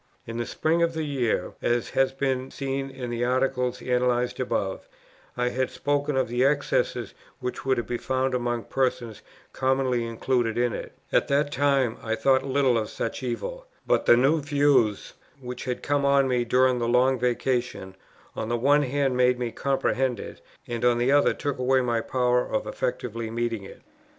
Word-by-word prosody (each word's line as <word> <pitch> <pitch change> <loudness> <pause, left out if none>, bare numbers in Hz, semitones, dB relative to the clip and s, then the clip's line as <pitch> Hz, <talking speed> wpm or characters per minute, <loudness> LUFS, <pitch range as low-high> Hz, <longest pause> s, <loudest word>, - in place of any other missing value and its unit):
In 115 0 -6
the 120 - -2
spring 165 +2 0
of 170 0 +2
the 160 - -1
year, 125 -10 -1
as 120 -1 0
has 135 0 +2
been 135 -1 -2
seen 135 0 -3
in 130 -2 -6
the 120 0 -2
Article 125 0 +1
analyzed 125 -1 +1
above, - - -2 0.5
I 125 0 +1
had 130 +1 -1
spoken 145 -1 -1
of 130 - +1
the 120 +2 0
excesses 145 +1 0 0.3
which 125 0 -4
were 130 - +4
to 120 - -1
be 120 +2 -4
found 130 0 -1
among 120 -2 -1
persons 120 -2 -2 0.3
commonly 130 -2 +1
included 115 0 -1
in 120 -2 +1
it: - - -6 0.2
at - - +3
that 145 +1 +1
time 140 -5 +1
I 110 0 -1
thought 130 +4 +3
little 135 -3 +2
of 110 - -4
such 115 - -4
an 130 - -2
evil, - - -5 0.2
but - - +1
the 120 - +7
new 145 +5 +3
views, 140 -7 +2 0.3
which 125 -1 -7
had 125 -2 -3
come 145 -1 +1
on 140 -1 +4
me 125 -2 +1
during 125 +1 +3
the 120 - -1
Long 125 +2 +3
Vacation, 120 -5 -1 0.4
on 110 - -4
the 120 - +1
one 145 +5 +4
hand 135 -1 0
made 125 0 +3
me 120 -2 -3
comprehend 130 -3 0
it, - - -9 0.3
and 120 -1 -4
on 120 -1 +4
the 120 +3 +2
other 145 0 +4
took 145 -3 -3
away 130 +1 +3
my 120 -2 0
power 125 0 +1
of 270 -1 -2
effectually 125 - -3
meeting 115 -1 -2
it. - - -13
125 Hz, 185 wpm, -26 LUFS, 120-135 Hz, 0.5 s, the